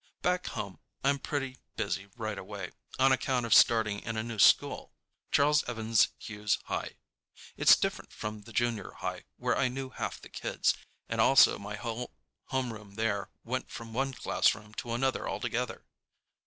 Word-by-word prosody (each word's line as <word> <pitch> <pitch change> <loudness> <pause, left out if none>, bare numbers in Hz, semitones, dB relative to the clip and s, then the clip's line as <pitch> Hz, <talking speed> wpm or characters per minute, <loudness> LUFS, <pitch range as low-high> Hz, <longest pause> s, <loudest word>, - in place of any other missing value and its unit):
Back 180 0 +1
home 100 -2 -5 0.2
I'm 140 +1 +3
pretty 135 -3 -3 0.2
busy 100 -2 -2
right 110 -2 -3
away, 95 -1 -6 0.3
on 135 +1 +5
account 130 -2 +1
of 115 - +3
starting 110 -3 +5
in 115 +1 -4
a 110 - 0
new 115 -2 -5
school, - - +4 0.4
Charles 150 +1 +4
Evans 115 -2 +3
Hughes 105 -1 -1
High. - - -4 0.6
It's - - +7
different - - -3
from 105 0 -5
the 115 - -13
junior 115 -3 -1
high, - - -5
where - - +1
I 135 - +2
knew 130 +1 -5
half - - -4
the - - -12
kids, - - 0 0.3
and - - 0
also 135 0 +6
my 105 +1 -5
whole 115 +2 -4 0.4
homeroom 110 -6 -3
there 105 -2 -1
went 130 +2 -3
from 115 -2 -8
one 135 +2 -1
classroom 105 -1 +1
to 115 - -4
another 130 +2 0
together. - - -3
115 Hz, 160 wpm, -30 LUFS, 105-130 Hz, 0.6 s, It's